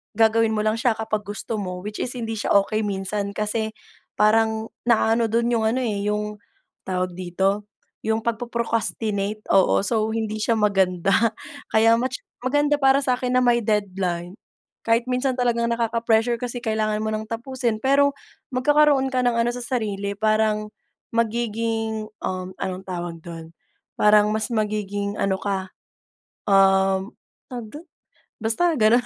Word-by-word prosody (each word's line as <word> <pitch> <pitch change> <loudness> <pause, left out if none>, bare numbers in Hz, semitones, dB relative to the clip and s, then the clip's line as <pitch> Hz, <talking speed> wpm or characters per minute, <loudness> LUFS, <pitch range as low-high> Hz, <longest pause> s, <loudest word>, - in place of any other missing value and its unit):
gagawin 225 0 +3
mo 210 - 0
lang 215 +1 0
siya 235 -1 +2
kapag 215 -2 -3
gusto 210 +1 -4
mo 180 -2 -5
which 210 +1 -6
is 245 - -2
hindi 225 -2 -3
siya - - 0
okey 215 +2 -2
minsan 200 0 -3
kasi 220 +1 -1 0.4
parang 220 +1 +2 0.2
na-a-ano 230 0 +3
dun 235 +2 +1
yung 225 -2 +1
ano 245 +4 0
eh, 205 -3 -2
yung 210 0 -2 0.5
tawag 185 -1 -1
dito? 190 +3 -1 0.4
Yung 220 0 0
pag 230 -1 -1
po-procrastinate, 220 -3 -2
oo 195 0 +4
so 215 +1 +1
hindi 215 -1 -2
siya 225 +2 +1
maganda 195 -3 +2 0.6
kaya 225 +1 +5
much 255 +2 -2 0.2
maganda 290 +3 +1
para 270 0 +4
sa 255 -2 +1
akin 250 0 -1
na - - +2
may 240 -1 +4
deadline 190 -4 -1 0.5
kahit 230 +1 +3
minsan 255 +1 0
talagang 240 -2 +1
nakaka-pressure 230 0 +1
kasi 245 0 -5
kailangan 215 -2 0
mo 220 - -1
ng 215 0 -3
tapusin 235 0 -2
pero 280 +1 +3 0.4
magkakaroon 285 0 +3
ka 255 - 0
ng 240 - +2
ano 235 +1 +2
sa 245 - -5
sarili, 205 -5 -2
parang, 215 0 +1 0.4
magiging, 225 -1 -1 0.2
um, 185 0 -3
anong 190 0 -4
tawag 175 -2 -5
dun, 165 -1 -9 0.5
parang 210 0 +5
mas 220 0 0
magiging 205 -2 -2
ano 195 -1 +1
ka, 190 -1 -3 0.8
um, 195 +1 +3 0.4
tawag 240 -3 -6
dun? 305 +3 -10 0.6
Basta 230 +11 +2
ganun. 235 +2 +4
220 Hz, 150 wpm, -23 LUFS, 205-235 Hz, 0.8 s, kaya